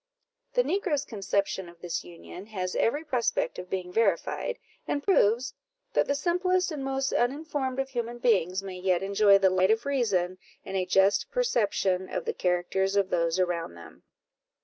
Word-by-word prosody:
The -, -, +3 dB
negro's 340 Hz, -, 0 dB
conception 200 Hz, -4 st, -2 dB
of 170 Hz, 0 st, -17 dB
this 175 Hz, -1 st, -3 dB
union 85 Hz, -, -11 dB
has 185 Hz, -4 st, -4 dB
every 290 Hz, +7 st, +1 dB
prospect 255 Hz, -, -1 dB
of 180 Hz, 0 st, -8 dB
being 180 Hz, -1 st, -4 dB
verified, 225 Hz, +3 st, 0 dB, 0.3 s
and 285 Hz, -, -1 dB
proves 245 Hz, -, +3 dB, 0.4 s
that -, -, +2 dB
the 280 Hz, -, +1 dB
simplest 360 Hz, +3 st, +1 dB
and 295 Hz, -3 st, -4 dB
most 270 Hz, 0 st, -1 dB
uninformed 270 Hz, 0 st, -1 dB
of 270 Hz, 0 st, -1 dB
human 240 Hz, -2 st, -4 dB
beings 195 Hz, -6 st, +1 dB
may 185 Hz, -2 st, -7 dB
yet 185 Hz, 0 st, +1 dB
enjoy 200 Hz, 0 st, +5 dB
the 190 Hz, -1 st, +3 dB
light 185 Hz, +1 st, +3 dB
of 225 Hz, +3 st, +2 dB
reason, 195 Hz, -10 st, 0 dB, 0.3 s
and 195 Hz, -, -5 dB
a 185 Hz, -1 st, 0 dB
just 195 Hz, +2 st, +3 dB
perception 205 Hz, -, 0 dB
of -, -, -3 dB
the 460 Hz, -, -1 dB
characters 185 Hz, -, 0 dB
of 200 Hz, -2 st, +1 dB
those 170 Hz, 0 st, +1 dB
around 175 Hz, -, -1 dB
them. 85 Hz, -, -13 dB
200 Hz, 170 wpm, -28 LUFS, 185-270 Hz, 0.4 s, enjoy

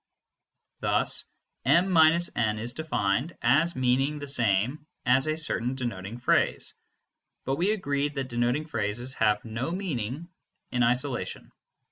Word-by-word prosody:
Thus -, -, +1 dB, 0.4 s
m 170 Hz, +9 st, +4 dB
− 165 Hz, +1 st, +5 dB
n 110 Hz, -3 st, 0 dB
is 115 Hz, +3 st, -3 dB
defined 140 Hz, -, -1 dB
as 150 Hz, +8 st, +3 dB
meaning 130 Hz, +3 st, +1 dB
the 145 Hz, -1 st, -7 dB
same 125 Hz, +3 st, 0 dB, 0.2 s
as 130 Hz, +3 st, +4 dB
a 155 Hz, 0 st, 0 dB
certain 130 Hz, -5 st, +1 dB
denoting 115 Hz, -4 st, -4 dB
phrase; 120 Hz, -, +1 dB, 0.7 s
but 135 Hz, +1 st, -1 dB
we 180 Hz, +4 st, +1 dB
agreed 145 Hz, -7 st, -1 dB
that 135 Hz, -1 st, -3 dB
denoting 120 Hz, +5 st, 0 dB
phrases 120 Hz, -1 st, -2 dB
have 110 Hz, -2 st, +1 dB
no 115 Hz, +6 st, -3 dB
meaning 160 Hz, -, -4 dB, 0.4 s
in 125 Hz, -, 0 dB
isolation. 125 Hz, +2 st, 0 dB
130 Hz, 130 wpm, -27 LUFS, 120-155 Hz, 0.7 s, −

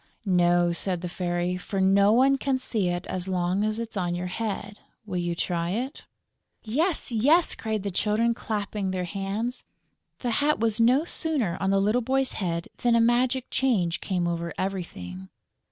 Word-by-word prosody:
"No," 175 Hz, -2 st, +3 dB
said 180 Hz, 0 st, -2 dB
the 180 Hz, -, -3 dB
Fairy, 175 Hz, 0 st, -1 dB
"for 195 Hz, +2 st, -4 dB
no 200 Hz, +2 st, +5 dB
one 270 Hz, +4 st, +4 dB
can 270 Hz, -1 st, +1 dB
see 220 Hz, -7 st, -1 dB
it 175 Hz, 0 st, -2 dB
as 185 Hz, 0 st, -4 dB
long 185 Hz, +1 st, 0 dB
as 215 Hz, 0 st, 0 dB
it's 230 Hz, -1 st, -5 dB
on 175 Hz, -3 st, -1 dB
your 175 Hz, +1 st, -3 dB
head.... 205 Hz, +1 st, -4 dB, 0.3 s
Will 185 Hz, -4 st, -3 dB
you 175 Hz, -1 st, -1 dB
try 170 Hz, -1 st, -1 dB
it?" 250 Hz, -, -3 dB, 0.6 s
"Yes, 300 Hz, -, 0 dB
yes!" 285 Hz, +10 st, +4 dB
cried 220 Hz, -3 st, -3 dB
the 200 Hz, -, -2 dB
Children, 215 Hz, +5 st, +1 dB
clapping 210 Hz, -3 st, -3 dB
their 185 Hz, -1 st, -2 dB
hands. 200 Hz, +6 st, -3 dB, 0.6 s
The 245 Hz, -, -1 dB
hat 290 Hz, +6 st, +1 dB
was 225 Hz, 0 st, +1 dB
no 255 Hz, +7 st, +4 dB
sooner 285 Hz, -, 0 dB
on 195 Hz, -, 0 dB
the 195 Hz, 0 st, +3 dB
little 210 Hz, +5 st, +2 dB
boy's 265 Hz, +2 st, 0 dB
head 170 Hz, -3 st, -2 dB
than 240 Hz, -1 st, +2 dB
a -, -, +5 dB
magic 245 Hz, +2 st, +2 dB
change 195 Hz, -11 st, +1 dB
came 180 Hz, -3 st, -1 dB
over 170 Hz, 0 st, -3 dB
everything. 95 Hz, -, -5 dB
200 Hz, 175 wpm, -26 LUFS, 180-235 Hz, 0.6 s, no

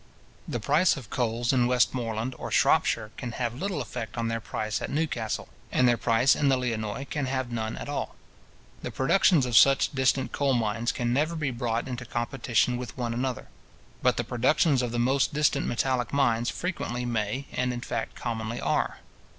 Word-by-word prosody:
The 120 Hz, -, -2 dB
price 150 Hz, -, +3 dB
of 120 Hz, -7 st, -10 dB
coals 120 Hz, 0 st, 0 dB
in 125 Hz, -2 st, +3 dB
Westmoreland 125 Hz, -1 st, 0 dB
or -, -, -5 dB
Shropshire 110 Hz, -2 st, +2 dB
can 120 Hz, -3 st, -5 dB
have 120 Hz, -2 st, -2 dB
little 185 Hz, -8 st, -2 dB
effect 110 Hz, -1 st, -6 dB
on 115 Hz, -1 st, -1 dB
their 115 Hz, 0 st, -1 dB
price 110 Hz, -1 st, -3 dB
at -, -, -3 dB
Newcastle; 155 Hz, +2 st, -2 dB, 0.2 s
and 130 Hz, -, +3 dB
their 120 Hz, -, +4 dB
price 115 Hz, +3 st, +3 dB
in 145 Hz, -, +2 dB
the 135 Hz, -, +4 dB
Lionnois 115 Hz, 0 st, -3 dB
can 145 Hz, -3 st, -2 dB
have 130 Hz, -2 st, -2 dB
none 110 Hz, -1 st, -3 dB
at -, -, -6 dB
all. -, -, -3 dB, 0.7 s
The -, -, -4 dB
productions 145 Hz, +1 st, +3 dB
of 125 Hz, -2 st, -2 dB
such 135 Hz, +4 st, +6 dB
distant 130 Hz, 0 st, +1 dB
coal 140 Hz, -2 st, +1 dB
mines 115 Hz, 0 st, 0 dB
can 120 Hz, -1 st, -1 dB
never 155 Hz, +5 st, +1 dB
be 150 Hz, -4 st, -1 dB
brought 120 Hz, -1 st, -2 dB
into 125 Hz, -1 st, -5 dB
competition 120 Hz, 0 st, 0 dB
with 125 Hz, 0 st, -7 dB
one 120 Hz, -2 st, -2 dB
another. 125 Hz, +1 st, -3 dB, 0.5 s
But 125 Hz, -1 st, +2 dB
the 120 Hz, -, 0 dB
productions 130 Hz, +4 st, +2 dB
of 120 Hz, -2 st, -2 dB
the 120 Hz, -, -2 dB
most 135 Hz, +4 st, +2 dB
distant 145 Hz, -2 st, +2 dB
metallic 125 Hz, 0 st, 0 dB
mines 120 Hz, -4 st, +2 dB
frequently 125 Hz, -9 st, -3 dB
may, 115 Hz, +3 st, -2 dB
and 125 Hz, 0 st, 0 dB
in 120 Hz, -1 st, -4 dB
fact -, -, -4 dB
commonly 115 Hz, 0 st, -4 dB
are. -, -, -1 dB
125 Hz, 185 wpm, -27 LUFS, 115-135 Hz, 0.7 s, such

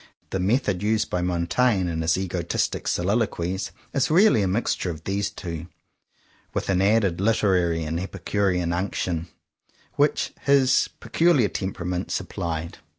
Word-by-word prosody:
The 95 Hz, -, -1 dB
method 100 Hz, -1 st, +1 dB
used 105 Hz, +1 st, 0 dB
by 90 Hz, -, 0 dB
Montaigne 90 Hz, +4 st, +1 dB
in 80 Hz, -1 st, -2 dB
his 80 Hz, +1 st, +2 dB
egotistic 90 Hz, -2 st, -2 dB
soliloquies 95 Hz, -1 st, -1 dB, 0.2 s
is 135 Hz, -2 st, +1 dB
really 185 Hz, -, +5 dB
a 95 Hz, -, +1 dB
mixture 95 Hz, -1 st, 0 dB
of 80 Hz, -2 st, -6 dB
these 100 Hz, +2 st, -1 dB
two, 85 Hz, -5 st, -6 dB, 0.9 s
with -, -, -2 dB
an 95 Hz, -1 st, +2 dB
added 100 Hz, -3 st, +2 dB
literary 95 Hz, -6 st, +2 dB
and 80 Hz, +2 st, -2 dB
epicurean 90 Hz, -2 st, -1 dB
unc 95 Hz, +3 st, -2 dB
tion 85 Hz, -1 st, -2 dB, 0.7 s
which -, -, +2 dB
his 135 Hz, -2 st, +4 dB
peculiar 160 Hz, -, +3 dB
temperament 90 Hz, 0 st, -3 dB
sup -, -, -3 dB
plied. 85 Hz, 0 st, -4 dB
95 Hz, 140 wpm, -24 LUFS, 85-105 Hz, 0.9 s, really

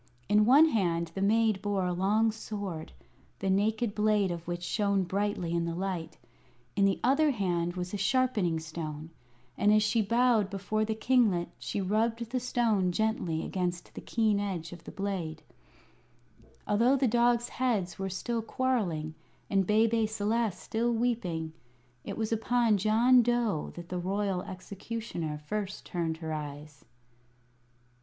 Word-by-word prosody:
In 210 Hz, 0 st, +4 dB
one 295 Hz, +6 st, +7 dB
hand 170 Hz, -, 0 dB
the 195 Hz, -, -4 dB
maid 215 Hz, 0 st, +2 dB
bore 200 Hz, -2 st, 0 dB
a 180 Hz, -, 0 dB
long 210 Hz, +5 st, +2 dB
sword, 200 Hz, -7 st, -6 dB, 0.5 s
the 195 Hz, 0 st, -1 dB
naked 215 Hz, +3 st, +1 dB
blade 210 Hz, -3 st, +2 dB
of 170 Hz, -1 st, -6 dB
which 175 Hz, 0 st, -4 dB
shone 200 Hz, +1 st, +1 dB
brightly 190 Hz, -2 st, -1 dB
in 170 Hz, 0 st, +1 dB
the 170 Hz, 0 st, -3 dB
light. 180 Hz, -3 st, -4 dB, 0.6 s
In 200 Hz, -, +3 dB
the 195 Hz, -1 st, +2 dB
other 280 Hz, +5 st, +4 dB
hand 175 Hz, -7 st, -1 dB
was 180 Hz, +1 st, -4 dB
a -, -, -1 dB
sharpening 205 Hz, -6 st, +1 dB
stone, 160 Hz, -1 st, -6 dB, 0.5 s
and 205 Hz, -, +4 dB
as 215 Hz, 0 st, +5 dB
she 220 Hz, +1 st, +2 dB
bowed 230 Hz, -1 st, +3 dB
before 200 Hz, +2 st, -1 dB
the 220 Hz, 0 st, -2 dB
kinglet 220 Hz, -7 st, +2 dB
she 125 Hz, +10 st, -3 dB
rubbed 225 Hz, +4 st, 0 dB
the 255 Hz, -, 0 dB
stone 225 Hz, -7 st, +1 dB
gently 180 Hz, -5 st, -1 dB
against 180 Hz, -2 st, -3 dB
the -, -, -7 dB
keen 215 Hz, -3 st, +1 dB
edge 180 Hz, -5 st, -3 dB
of 175 Hz, -, -12 dB
the -, -, -8 dB
blade. 180 Hz, -6 st, -4 dB, 1.2 s
Although 235 Hz, +6 st, +3 dB
the 270 Hz, -1 st, +2 dB
dog's 240 Hz, +1 st, +2 dB
heads 215 Hz, -9 st, -1 dB
were 195 Hz, 0 st, -2 dB
still 230 Hz, +5 st, -2 dB
quarrelling, 215 Hz, -, -1 dB, 0.4 s
and 195 Hz, -2 st, +2 dB
Bebe 220 Hz, +1 st, +3 dB
Celeste 215 Hz, -2 st, -1 dB
still 235 Hz, +2 st, 0 dB
weeping, 205 Hz, -10 st, -1 dB, 0.5 s
it -, -, -6 dB
was 220 Hz, -1 st, -2 dB
upon 225 Hz, -1 st, +2 dB
John 230 Hz, +5 st, +5 dB
Dough 235 Hz, -8 st, 0 dB
that 170 Hz, 0 st, -9 dB
the 180 Hz, -, -3 dB
Royal 195 Hz, 0 st, -1 dB
Executioner 185 Hz, -4 st, -5 dB
first 195 Hz, +6 st, -5 dB
turned 165 Hz, -2 st, -2 dB
her 160 Hz, -1 st, -4 dB
eyes. 150 Hz, -1 st, -7 dB
200 Hz, 150 wpm, -29 LUFS, 175-225 Hz, 1.2 s, one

